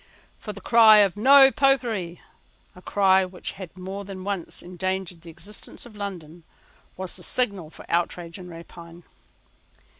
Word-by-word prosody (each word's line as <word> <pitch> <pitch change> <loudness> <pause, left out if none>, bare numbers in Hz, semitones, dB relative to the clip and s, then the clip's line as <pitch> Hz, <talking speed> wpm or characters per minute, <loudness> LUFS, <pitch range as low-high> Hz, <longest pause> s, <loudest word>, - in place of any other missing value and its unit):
For 210 - -7
the 200 -1 -11
cry 225 0 +7
of 195 -2 +2
No 270 +5 +7
Popery, 235 - 0 0.5
a 180 - -14
cry 190 -1 +3
which 185 -1 -6
has 190 -3 -9
more 190 +2 -7
than 190 -1 -9
once 195 -3 -5
endangered 185 -1 -4
the 170 - -12
existence 200 +9 -6
of 230 -3 -14
London, 175 -5 -7 0.6
was 185 -1 -4
the - - -10
signal 200 -5 -2
for - - -14
outrage 170 +1 -2
and 180 -1 -10
rapine. 170 0 -12
190 Hz, 150 wpm, -24 LUFS, 175-205 Hz, 0.6 s, cry